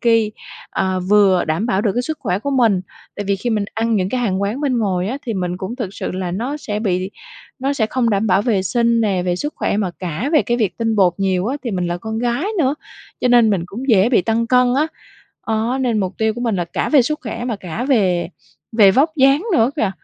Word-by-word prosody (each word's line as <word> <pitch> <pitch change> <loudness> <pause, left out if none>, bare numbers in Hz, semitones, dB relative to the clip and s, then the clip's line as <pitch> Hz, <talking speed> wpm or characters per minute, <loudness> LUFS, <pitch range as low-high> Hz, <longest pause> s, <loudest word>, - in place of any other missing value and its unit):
ky, 230 -2 +2 0.4
ờ, 185 -1 -1
vừa 190 -1 +4
đảm 160 +8 -1
bảo 195 -4 +1
được 210 -3 +1
cái 245 - 0
sức 310 +4 -4
khỏe 180 - -1
của 280 +7 -3
mình. 230 -8 +3 0.4
Tại 205 - -4
vì 200 0 0
khi 240 +5 -3
mình 215 -2 0
ăn 225 0 +1
những 185 -2 0
cái 250 +4 -1
hàng 200 -4 0
quán 215 +8 -2
bên 265 -4 0
ngoài 190 -4 0
á 265 +5 -3
thì 230 - -2
mình 180 -2 -2
cũng 190 +6 -5
thực 235 -7 -3
sự - - -4
là 185 -1 -3
nó 245 +11 -3
sẽ 210 -7 -4
bị 185 -2 -1 0.5
nó 270 +2 0
sẽ 230 -6 0
không 235 -1 0
đảm 205 +2 +1
bảo 200 0 +3
vệ 210 -6 +1
sinh 235 +3 +1
nè, 195 -5 +1
về 180 0 -1
sức 295 +9 -4
khỏe - - -1
mà 200 -3 0
cả 180 - -3
về 305 - +5
cái 240 -1 0
việc 215 -6 -1
tinh 225 -1 0
bột 185 -3 +4
nhiều 190 -1 0
á. 265 +5 -1
Thì 240 - -2
mình 180 -3 -1
là 175 0 -2
con 220 +3 -4
gái 245 +5 -1
nữa, 280 -3 +2 0.5
cho 250 - +2
nên 240 -3 +5
mình 190 -5 0
cũng 245 +9 -7
dễ 210 -2 +5
bị 240 -7 +3
tăng 225 +2 0
cân 250 0 +3
á. 300 +3 +2 0.6
Đó, 225 +3 0
nên 235 -4 +1
mục 190 -1 -2
tiêu 220 -1 +1
của 240 - -6
mình 230 -5 0
là 175 - -1
cả 170 - -3
về 285 -4 +5
sức 305 +5 -2
khỏe 230 0 -5
mà 235 -4 -2
cả 190 +5 -5
về 190 -11 +2 0.4
về 210 -3 +6
vóc 275 +10 +3
dáng 275 +4 +4
nữa 235 -5 +3
kìa, 220 -9 +1
220 Hz, 260 wpm, -19 LUFS, 190-245 Hz, 0.6 s, về